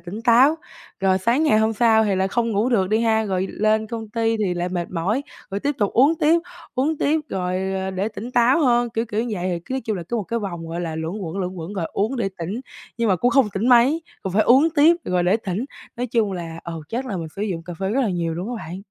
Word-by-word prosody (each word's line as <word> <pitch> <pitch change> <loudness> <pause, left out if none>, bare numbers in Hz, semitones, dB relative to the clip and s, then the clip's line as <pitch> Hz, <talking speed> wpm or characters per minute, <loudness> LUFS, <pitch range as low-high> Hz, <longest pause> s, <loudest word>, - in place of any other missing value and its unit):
tỉnh 205 +6 -7
táo. 255 +6 +6 0.5
Rồi 190 -1 +3
sáng 235 +10 +2
ngày 260 -9 +4
hôm 220 +1 +2
sau 220 0 +4
thì 200 -2 +1
lại 190 +1 +1
không 230 +2 0
ngủ 215 +3 +1
được 195 -7 +2
đi 215 +2 +2
ha, 220 -1 +2
rồi 190 -1 -1
lên 215 +1 +1
công 225 -1 -6
ty 225 0 0
thì 195 -4 0
lại 175 +1 -2
mệt 175 -2 -3
mỏi, 190 +10 -1 0.3
rồi 200 +1 -3
tiếp 285 0 -1
tục 205 -2 +1
uống 275 +7 +5
tiếp, 330 +3 +4 0.3
uống 285 +4 0
tiếp 310 +2 +2
rồi, 185 +1 -2
ờ, 190 0 -2
để 190 +3 -2
tỉnh 225 +2 -7
táo 245 +4 +4
hơn, 240 -3 +3
kiểu 225 +1 -1
kiểu 225 +1 -2
vậy. 185 -2 -2
Thì 175 - -1
cứ, 260 - -9
nói 265 - -1
chung 220 -2 -3
là, 175 - -5
cứ 240 - -1
một 215 - -1
cái 235 +5 -2
vòng, 175 -6 -5
gọi 170 +1 -4
là, 160 -2 -4
luẩn 160 +2 -3
quẩn, 180 -1 -5
luẩn 185 -1 -2
quẩn, 170 +3 -6
rồi 180 -5 -2
uống 220 +7 -1
để 205 -5 0
tỉnh 185 +8 -4 0.4
nhưng 230 - +1
mà 190 - +3
cũng 245 +7 +2
không 270 -6 +4
tỉnh 215 +6 0
mấy, 260 +7 +5 0.2
còn 190 - -3
phải 215 +3 +4
uống 270 +7 +5
tiếp 320 +2 +5
rồi 180 -1 +1
để 185 +5 +3
tỉnh. 205 +1 -3 0.3
Nói 245 +1 -2
chung 225 -4 0
là, 165 -3 -6
ừ, 170 - -5 0.2
chắc 255 +3 -3
là 200 - -3
mình 165 -2 -5
sử 205 - -3
dụng 180 -6 -3
cà 175 0 -8
phê 190 - -1
rất 265 - +1
là 245 - +1
nhiều 170 -2 -2
luôn 180 +6 -4
á - - -8
bạn. 170 - -6
215 Hz, 275 wpm, -22 LUFS, 185-240 Hz, 0.5 s, táo